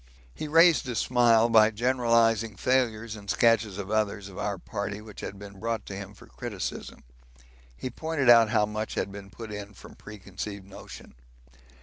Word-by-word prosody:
He 155 - -6
raised 165 -3 +5
a 120 - -3
smile 120 -1 +4
by 110 -2 +6
generalising 115 -2 +1
failures 115 -1 0
in 100 -1 -12
sketches 110 -2 +2
of 100 0 -6
others 105 -2 -1
of 95 - -12
our 100 -1 -2
party 100 +2 -5
which 105 -1 -11
had 100 - -6
been 100 -1 -11
brought 115 -1 -3
to 100 - -7
him 100 +1 -8
for - - -15
criticism. 110 -6 -6 0.7
He 130 - -5
pointed 155 0 -2
out 115 -2 +7
how 105 - +2
much 110 +1 -5
had 100 - -2
been 100 0 -10
put 110 +1 -9
in 105 -1 -8
from - - -13
preconceived 100 -1 -8
notion. 95 - -12
110 Hz, 170 wpm, -27 LUFS, 100-115 Hz, 0.7 s, out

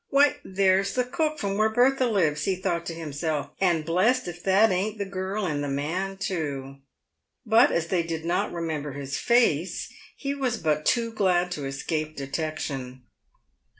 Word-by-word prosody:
"Why, 280 0 +4
there's 195 0 +2
the 250 - +2
cook 310 +5 -1
from 200 -6 -2
where 215 0 +4
Bertha 255 +3 +3
lives," 155 -9 +1
he 190 - +1
thought 170 -2 -2
to 165 - -4
himself; 155 -2 -3
" - - -28
and 170 -5 +2
blessed 190 +9 +2
if 175 0 -7
that 195 +3 +5
ain't 200 +4 -1
the 200 - -2
girl 190 +2 -3
and 145 -4 -1
the - - -2
man 170 +8 -2
too." 140 -8 -3 0.7
But 230 +5 +5
as 170 - +1
they 180 -2 +2
did 165 -1 -4
not 175 +2 0
remember 155 -4 -3
his 140 0 -4
face, 210 -9 +2 0.2
he 275 -1 -3
was 260 -4 -1
but 155 -4 0
too 230 -1 +2
glad 180 -4 +1
to 145 -5 -3
es 135 0 -5
cape 155 -1 -2
detection. 140 -3 -4
180 Hz, 180 wpm, -26 LUFS, 155-215 Hz, 0.7 s, that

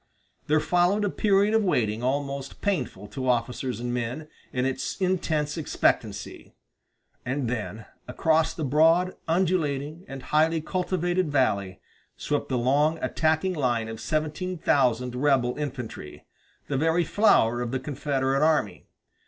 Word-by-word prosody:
There 155 +1 +3
followed 180 +6 +2
a 200 - -1
period 205 0 +2
of 225 -1 +3
waiting 115 - 0
almost 140 +1 -3
painful 130 - -2
to 130 +4 -3
officers 125 +1 -1
and 120 0 -3
men, 125 +6 -4 0.2
in 125 0 -1
its 135 +8 -3
intense 165 -5 0
expectancy; 155 - -1 0.7
and 130 0 -2
then 110 -2 -4 0.2
across 160 +5 +2
the 160 - -4
broad, 165 +6 +3
undulating, 160 -3 0
and 135 -1 -8
highly 160 +2 +2
cultivated 180 0 -1
valley 100 -9 0 0.4
swept 145 -1 -2
the 130 - 0
long 145 +6 +2
attacking 160 +4 0
line 120 -7 0
of 110 0 -7
seventeen 155 +4 -2
thousand 125 -5 +1
rebel 130 -2 +2
infantry, 125 - -6 0.4
the 140 - -2
very 165 +4 +2
flower 135 - +3
of 120 - -2
the 130 +2 -2
Confederate 135 -1 -1
army. 155 -1 +1
145 Hz, 135 wpm, -26 LUFS, 125-165 Hz, 0.7 s, There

